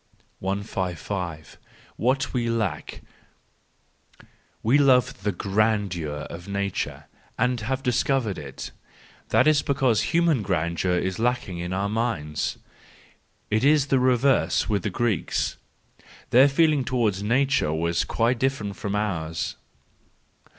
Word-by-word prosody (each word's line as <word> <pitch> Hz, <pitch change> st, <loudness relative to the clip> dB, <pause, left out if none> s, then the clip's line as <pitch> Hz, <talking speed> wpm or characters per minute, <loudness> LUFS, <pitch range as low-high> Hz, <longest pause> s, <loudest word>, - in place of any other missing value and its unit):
XS 95 Hz, -2 st, -2 dB
5 85 Hz, -7 st, -5 dB, 0.4 s
What 130 Hz, +3 st, 0 dB
we 120 Hz, -2 st, 0 dB
Lack 110 Hz, -9 st, -3 dB, 1.6 s
.—We 125 Hz, +6 st, +4 dB
love 125 Hz, -7 st, +3 dB
the 105 Hz, +1 st, 0 dB
grandeur 95 Hz, -6 st, -1 dB
of 85 Hz, +2 st, -9 dB
Nature 100 Hz, -1 st, -3 dB, 0.3 s
and 125 Hz, 0 st, +1 dB
have 130 Hz, +4 st, -2 dB
discovered 125 Hz, -4 st, 0 dB
it; 70 Hz, -3 st, -8 dB, 0.6 s
that -, -, +4 dB
is 155 Hz, -2 st, +4 dB
because 130 Hz, -6 st, +2 dB
human 165 Hz, -6 st, +2 dB
grandeur 90 Hz, -1 st, 0 dB
is 95 Hz, +2 st, -2 dB
lacking 120 Hz, -7 st, -1 dB
in 90 Hz, +1 st, -4 dB
our 95 Hz, +2 st, 0 dB
minds. 100 Hz, -9 st, -2 dB, 0.9 s
It 110 Hz, +2 st, +2 dB
was 145 Hz, 0 st, +4 dB
the 135 Hz, -, +3 dB
reverse 130 Hz, +1 st, +2 dB
with 105 Hz, -3 st, 0 dB
the -, -, -2 dB
Greeks: 115 Hz, -8 st, -1 dB, 0.7 s
their 130 Hz, +3 st, +7 dB
feeling 150 Hz, -1 st, +3 dB
towards 115 Hz, -6 st, 0 dB
Nature 125 Hz, -, +2 dB
was 85 Hz, +2 st, 0 dB
quite 115 Hz, +1 st, 0 dB
different 115 Hz, -7 st, -1 dB
from 100 Hz, 0 st, -3 dB
ours. 80 Hz, -7 st, -2 dB
110 Hz, 120 wpm, -25 LUFS, 90-130 Hz, 1.6 s, their